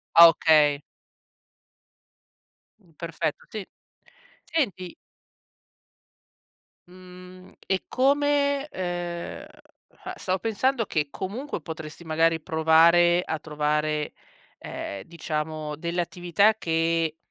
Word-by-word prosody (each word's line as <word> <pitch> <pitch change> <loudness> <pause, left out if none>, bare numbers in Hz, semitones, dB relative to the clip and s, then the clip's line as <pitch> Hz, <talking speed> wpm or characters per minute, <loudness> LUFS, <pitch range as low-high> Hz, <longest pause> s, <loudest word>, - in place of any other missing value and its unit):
Ah 170 0 +11
okay. 150 -3 +4 2.2
Perfetto, 155 -2 -3
sì. 215 -3 -6 0.8
Senti 200 - -2 1.9
Mhmm, 185 0 -14 0.2
e 190 -1 0
come, 285 +1 +2
ehm, 175 -3 -5 0.7
stavo 185 0 -2
pensando 230 +3 0
che 150 -4 -1
comunque 210 - -5
potresti 160 +1 -8
magari 165 0 +1
provare 165 +2 +4
a 160 - -3
trovare, 150 0 -1 0.4
ehm, 100 -1 -7
diciamo 155 -2 -4
delle 170 +3 -2
attività 180 +5 +2
che 165 -3 0
170 Hz, 80 wpm, -25 LUFS, 160-190 Hz, 2.2 s, Ah